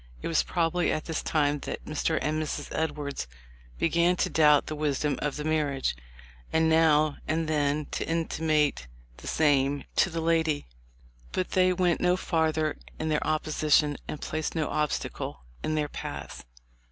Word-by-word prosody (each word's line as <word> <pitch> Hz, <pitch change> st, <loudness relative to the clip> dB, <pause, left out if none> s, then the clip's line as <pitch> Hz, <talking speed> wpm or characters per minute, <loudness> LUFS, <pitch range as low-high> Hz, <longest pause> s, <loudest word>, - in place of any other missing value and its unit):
It -, -, -2 dB
was 165 Hz, -, +3 dB
prob 165 Hz, -2 st, 0 dB
ably 180 Hz, -1 st, +1 dB
at 155 Hz, -, -2 dB
this 160 Hz, -2 st, -2 dB
time 145 Hz, -2 st, +1 dB
that -, -, -6 dB
Mr. 155 Hz, +1 st, 0 dB
and 155 Hz, +1 st, 0 dB
Mrs. 155 Hz, -, -4 dB
Edwards 145 Hz, -, -2 dB, 0.5 s
began 170 Hz, +2 st, +3 dB
to -, -, 0 dB
doubt 150 Hz, -2 st, +5 dB
the -, -, -4 dB
wisdom 150 Hz, -1 st, 0 dB
of 145 Hz, -1 st, -1 dB
the 150 Hz, -, -4 dB
marriage, 150 Hz, -, 0 dB, 0.6 s
and 160 Hz, 0 st, +3 dB
now 155 Hz, -2 st, +4 dB
and 160 Hz, 0 st, 0 dB
then 150 Hz, -1 st, +1 dB
to -, -, -3 dB
intimate 155 Hz, -, +1 dB, 0.3 s
the -, -, -10 dB
same 145 Hz, -2 st, +2 dB
to -, -, +4 dB
the 165 Hz, -1 st, -3 dB
lady; 160 Hz, -2 st, +1 dB, 0.7 s
but 185 Hz, -, -2 dB
they 185 Hz, 0 st, +4 dB
went 180 Hz, -2 st, +1 dB
no 180 Hz, 0 st, +3 dB
farther 160 Hz, -3 st, 0 dB, 0.2 s
in 155 Hz, -, -2 dB
their 150 Hz, -1 st, +1 dB
opposition 155 Hz, -1 st, +2 dB
and 150 Hz, -, -5 dB
placed 155 Hz, +1 st, -3 dB
no 155 Hz, -2 st, 0 dB
obstacle 150 Hz, -, -2 dB, 0.2 s
in 155 Hz, -, 0 dB
their 150 Hz, -1 st, 0 dB
paths. -, -, -7 dB
155 Hz, 165 wpm, -28 LUFS, 150-160 Hz, 0.7 s, doubt